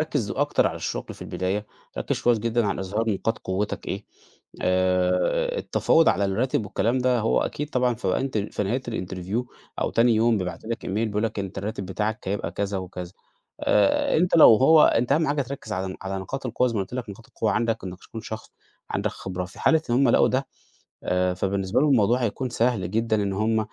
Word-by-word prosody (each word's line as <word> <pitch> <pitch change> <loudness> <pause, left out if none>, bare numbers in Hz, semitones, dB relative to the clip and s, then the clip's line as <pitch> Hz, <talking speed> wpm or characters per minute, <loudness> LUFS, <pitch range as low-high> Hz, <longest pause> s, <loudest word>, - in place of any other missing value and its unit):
ركز - - -1
أكتر - - +1
على - - -2
الشغل - - -4
في - - -10
البداية، 100 +3 -2 0.3
ركز - - -2
كويس 120 -2 +3
جدًا 115 0 0
على 100 - -1
إظهار 105 +4 -1
نقاط 110 +3 -1
قوتك 95 +3 -3
إيه. - - -4 0.6
آآ 90 - +1
التفاوض 165 - +3
على 100 - +2
الراتب 110 +4 0
والكلام 115 +5 0
ده 125 -1 +2
هو 110 - +2
أكيد 150 +1 -3
طبعًا 125 -1 +1
في 110 -4 -6
نهاية - - +2
ال 110 -6 -2
في - - -1
نهاية 120 +7 -1
الinterview 95 0 -3 0.4
أو - - 0
تاني 115 0 +4
يوم 115 0 +3
بيبعتوا 95 +4 -5
لك 115 - -4
email - - -3
بيقولوا 105 +2 0
لك 105 - -10
أنت 95 -1 -4
الراتب 100 -1 -4
بتاعك 105 +2 -3
هيبقى 100 +2 -2
كذا 100 -1 -2
وكذا. 90 -1 -7 0.5
آآ، 100 -2 +3
أنت 175 +1 +3
لو 115 -8 +9
هو 155 +5 +6
أنت 120 +4 +2
أهم 155 +2 +3
حاجة 145 -1 +1
تركّز 130 -4 -7
على 95 0 -2
ن - - -10
على 95 0 -3
نقاط 130 +8 -5
القوة 125 +2 +1
زي 115 - -4
ما 100 - 0
قُلت 95 +6 -5
لك 125 -5 -4
نقاط 110 +3 -12
القوة 110 - -1
عندك 115 -3 0
إنك 90 -1 -7
تكون 110 - -9
شخص 110 0 -8 0.4
عندك - - -1
خبرة. 90 -1 -5
في 90 - -13
حالة 160 0 +4
إن 120 - +3
هُم 135 0 +4
لقوا - - +5
ده، 135 +1 0 0.6
آآ 90 0 +1
فبالنسبة 95 +4 0
لهم 150 - +3
الموضوع 120 +1 +3
هيكون 125 +4 -2
سهل 115 -6 0
جدًا 110 -2 +1
إن 100 -1 -1
هُم، 110 +2 +1
110 Hz, 210 wpm, -25 LUFS, 95-125 Hz, 0.6 s, لو